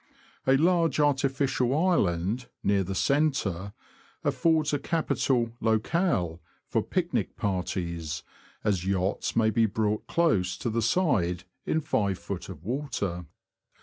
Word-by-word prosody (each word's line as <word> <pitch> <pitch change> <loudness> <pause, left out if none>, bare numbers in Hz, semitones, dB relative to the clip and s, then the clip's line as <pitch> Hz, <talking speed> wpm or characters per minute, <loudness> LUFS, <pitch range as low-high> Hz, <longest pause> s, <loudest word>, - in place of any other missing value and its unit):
A 135 0 +6
large 165 -2 +3
artificial 135 -2 +2
island, 115 - +1 0.2
near 100 -1 +2
the 95 +1 -4
centre, 105 - +1 0.5
affords 160 -3 +2
a 145 - +1
capital 135 -6 0
locale 110 - +1 0.2
for - - 0
picnic - - -1
parties, 85 -4 -2 0.4
as 95 -4 +1
yachts 95 0 -1
may 110 -1 +3
be 115 +1 +3
brought 105 0 -1
close 105 - +2
to 120 - -2
the 115 +1 0
side 105 - +1 0.2
in 160 -1 +1
5ft. 100 - -2
of - - -9
water. 100 - -3
110 Hz, 115 wpm, -28 LUFS, 95-145 Hz, 0.5 s, A